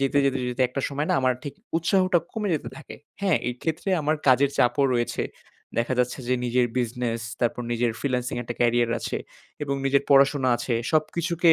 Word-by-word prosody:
যেতে, 135 +1 +2
যেতে, 135 -1 +1
যেতে 125 +1 0
একটা 135 +2 -3
সময় 145 +2 -2
না - - +3
আমার 130 -1 +2
ঠিক 145 -2 -6 0.2
উৎসাহটা 185 +1 +3
কমে 210 -2 -2
যেতে 155 - -3
থাকে। 160 - -10 0.2
হ্যাঁ? 190 -6 +3
এইক্ষেত্রে 160 +9 -3
আমার 155 +2 +1
কাজের 135 +2 +5
চাপও 130 +3 +3
রয়েছে। 120 -1 0 0.6
দেখা 120 +2 +1
যাচ্ছে 125 +1 +1
যে 125 - +3
নিজের 125 0 +2
বিজনেস, 120 -1 -1 0.2
তারপর 120 0 0
নিজের 120 0 +1
ফ্রিল্যান্সিং 125 -3 -1
একটা 120 0 -5
ক্যারিয়ার 120 -1 +3
আছে। - - -3 0.5
এবং 140 -1 -1
নিজের 135 0 +3
পড়াশোনা 135 -1 +5
আছে। 120 - -2 0.2
সব 155 -1 +5
কিছুকে 170 0 +4
135 Hz, 180 wpm, -25 LUFS, 120-155 Hz, 0.6 s, কাজের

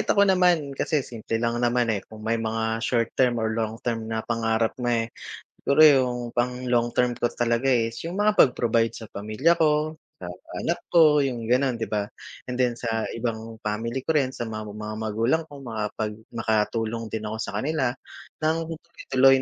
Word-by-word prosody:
Kahit - - -4
ako 200 0 +5
naman 180 -6 +3
kasi 140 +1 0
simple 115 -1 -4
lang 115 +1 -1
naman, 120 -1 +2
eh, 100 - -1
kung 110 0 -11
may 115 0 0
mga 110 0 -1
short 115 -1 0
term 125 -2 +2
or 110 -1 0
long 110 0 -2
term 115 -2 -2
na 110 0 -2
pangarap 115 -1 0
nga, 120 -2 +1
eh. - - -6 0.6
Siguro 140 +3 +4
yung 130 -4 +5
pang 125 +1 -1
long 120 -1 +2
term 125 -1 +1
ko - - 0
talaga, 120 +1 0
eh, 120 -4 +3
is 115 - -11
yung 180 +5 -2
mga 210 0 +3
pag 130 - +7
provide 115 -1 +1
sa 110 -3 -9
pamilya 110 +12 +1
ko, 155 0 +2 0.2
sa 90 - -5 0.3
anak 170 - 0 0.2
ko, 155 -3 +7
yung 120 -4 -3
ganon 130 +1 +3
'di 115 - -2
ba? 105 -1 0 0.4
And 125 - -5
then 120 -2 +1
sa 115 -2 -2
ibang 115 -1 -4
family 115 +5 -2
ko 160 - +1
rin 140 -4 +2
sa 120 -2 -5
mga 110 -1 -5 0.2
mga 105 0 -5
magulang 115 +8 +1
ko 145 - -10
makapag 110 -4 -4 0.2
makatulong 115 0 -1
din 110 0 -4
ako 110 +1 -4
sa 100 -1 -3
kanila 135 +2 0 0.6
ng 160 +1 +2 0.5
tuloy 135 0 +6
120 Hz, 195 wpm, -25 LUFS, 110-135 Hz, 0.6 s, pag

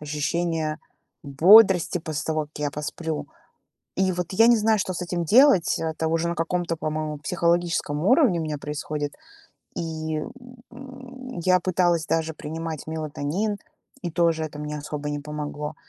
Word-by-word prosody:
ощущения 155 +1 -2 0.4
бодрости 180 +6 +6
после 155 -2 -4
того, 155 -1 0
как 150 0 -11
я 145 -1 -1
посплю. 150 +2 -4 0.7
И 190 -1 +2
вот 180 -1 -3
я 225 +5 +5
не 240 - +6
знаю, 220 -1 +2
что 185 - -2
с 180 - -5
этим 175 -1 -2
делать. 225 - +5
Это 160 0 -2
уже 165 +1 0
на 170 - -2
каком-то, 165 0 -1
по-моему, 155 -1 -3
психологическом 170 -2 0
уровне 255 - +4
у 160 - -2
меня 150 -1 -3
происходит. 150 0 -4 0.6
И, 160 -1 -3 0.5
м, 260 -2 -10
я 185 -1 +5
пыталась 175 -2 +1
даже 160 0 0
принимать 160 +1 -6
мелатонин, 160 +6 -2 0.5
и 175 - -3
тоже 165 -2 +1
это 150 -1 -7
мне 150 0 -4
особо 150 0 -5
не 145 - -3
помогло. 150 0 -5
165 Hz, 150 wpm, -24 LUFS, 150-180 Hz, 0.7 s, бодрости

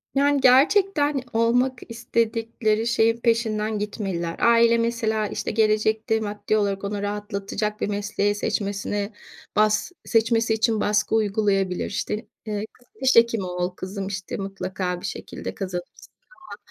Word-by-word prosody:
Yani, 285 0 +3
gerçekten 290 +2 +4
olmak 245 +3 +2
istedikleri 230 -1 -1
şeyin 230 -1 +3
peşinden 220 -2 0
gitmeliler. 195 -5 -3
Aile 235 0 +5
mesela, 230 -2 0
işte, - - -3
gelecekte 220 +1 +2
maddi 210 0 -1
olarak 200 -2 -1
onu 200 0 -3
rahatlatacak 205 +1 -3
bir - - +1
mesleği 205 0 0
seçmesine, 205 0 -2 0.4
bas 215 - +2
seçmesi 225 0 +2
için 220 0 +1
baskı 210 +1 +1
uygulayabilir. 200 -3 +1
İşte, 200 - -3 0.3
eee, 210 -1 -3
"Kızım, 245 -1 -27
diş 265 0 +4
hekimi 230 -3 +4
ol 180 0 -2
kızım, 190 +1 -5
işte, 195 -2 -5
mutlaka 190 -2 -4
bir - - -6
şekilde - - -6
kazanırsın." 180 -3 -6 0.3
falan. 360 - -10
215 Hz, 130 wpm, -24 LUFS, 200-230 Hz, 0.4 s, Aile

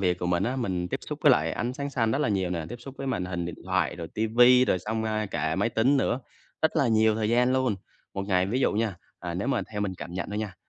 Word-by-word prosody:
việc 90 -2 +1
của 90 - -2
mình 90 +1 +1
á, 125 +6 -1
mình 90 -8 -2
tiếp - - -3
xúc - - -4
với - - +7
lại 80 +1 +1
ánh 120 +7 -2
sáng 140 +2 -4
xanh 115 -5 +1
rất 135 - +1
là 150 - +1
nhiều 95 -4 0
nè, 85 -3 -2
tiếp 120 - -6
xúc 135 +2 -10
với 135 - -4
màn 90 -9 -1
hình 90 -1 -3
điện 85 - -5
thoại - - 0
rồi 85 -2 -6
ti 110 - -1
vi 125 +3 +6
rồi 90 - +1
xong, 110 +4 -3
à, 110 -1 -1
cả 80 -4 -1
máy 115 - +1
tính 120 +5 +3
nữa, 130 -1 +1 0.4
rất 160 - +2
là 135 - +3
nhiều 110 -1 +4
thời 110 -1 -1
gian 125 +2 +3
luôn. 130 -5 +1 0.4
Một 95 - -2
ngày 90 -1 +2
ví 120 +7 -1
dụ - - +2
nha, 110 -1 0 0.3
à, 85 -1 -4
nếu 100 +9 -2
mà 135 -4 +1
theo 105 - -3
mình 100 -2 -1
cảm 85 - -8
nhận 90 - -3
thôi 105 - -3
nha, 105 -4 -4
110 Hz, 300 wpm, -27 LUFS, 90-125 Hz, 0.4 s, với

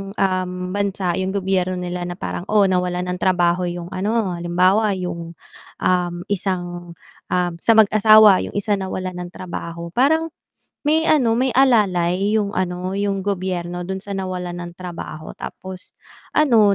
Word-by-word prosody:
um, 185 -2 0 0.2
bansa 200 -2 -1
yung 190 +1 -2
gobyerno 185 -1 0
nila 180 0 -4
na 175 - -5
parang, 180 0 -5
oh 210 -1 +4
nawalan 180 0 0
ng 180 - -4
trabaho 180 -1 +2
yung 175 0 -6
ano, 205 +1 0
halimbawa 185 +4 +2
yung, 170 -2 -5 0.5
um, 180 -1 +1 0.2
isang, 175 -3 -2 0.3
ah, 180 -1 0
sa 230 - +4
mag-asawa 215 -1 +7
yung - - -11
isa 205 0 0
nawalan 185 -1 -4
ng 175 - -5
trabaho, 170 -2 -7
parang 315 - +2 0.6
may 315 +2 +3
ano 250 -7 +3
may 255 +2 +1
alalay 205 -5 +3
yung 205 -1 -2
ano, 185 +1 -2
yung 200 -1 -1
gobyerno 180 -3 -3
dun 190 +2 -4
sa 200 +1 -6
nawalan 180 -2 -4
ng 175 0 -8
trabaho 170 -3 -7
tapos 185 -1 -9 0.4
ano 225 -9 +5
185 Hz, 145 wpm, -21 LUFS, 175-205 Hz, 0.6 s, mag-asawa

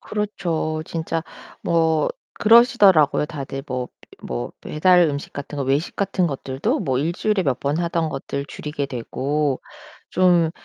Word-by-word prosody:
그렇죠. 170 -7 -2
진짜 165 0 -2 0.4
뭐 160 -2 +2 0.3
그러시더라고요. 210 - +5
다들 135 -3 -6
뭐 125 -1 -3 0.3
뭐 - - -4
배달 180 +3 +4
음식 140 0 -5
같은 140 +1 -6
거, - - 0
외식 140 +5 0
같은 195 -2 0
것들도 135 -2 -2
뭐 130 -1 0
1 160 +5 0
주일에 205 +2 0
몇 135 -6 -1
번 140 +2 0
하던 170 -1 0
것들 140 -1 -4
줄이게 145 -2 -4
되고 140 +3 -2 0.5
좀 175 -3 +4
155 Hz, 265 characters per minute, -22 LUFS, 140-175 Hz, 0.5 s, 그러시더라고요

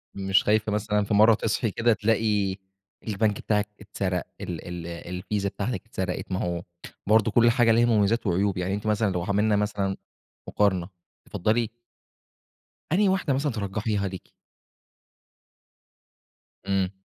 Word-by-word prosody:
مش 95 0 +2
خايفة 110 0 +2
مثلًا 105 0 0
في 100 - -2
مرة 110 +2 +7
تصحي 110 +1 -1
كده 115 +3 +2
تلاقي 105 -3 +1 0.5
البنك 105 -1 +1
بتاعِك 105 -1 0
اتسرق، 95 -3 -2 0.2
ال 85 -1 -6
ال 85 -1 -6
الفيزا 90 +4 -3
بتاعتِك 115 +5 -4
اتسرقت؟ 95 -4 -4
ما 95 - -1
هو 85 -1 -2 0.4
برضو 110 +1 +4
كل 120 +2 +5
حاجة 120 -1 +4
ليها 115 +1 +4
مميزات 110 0 +2
وعيوب 95 +2 +1
يعني 90 +1 -1
أنتِ 105 +1 -3
مثلًا 105 -1 +1
لو 90 -1 -2
عملنا 105 +3 +2
مثلًا 100 -2 -1 0.5
مقارنة 95 -4 +1 0.4
تفضّلي 110 +4 0 1.2
أنهي 195 +4 +4
واحدة 190 -7 +1
مثلًا 140 +2 0
ترجحيها 105 -1 -2
ليكِ؟ 95 -1 -9 2.4
امم. 95 -1 -1
105 Hz, 135 wpm, -26 LUFS, 95-110 Hz, 2.4 s, مرة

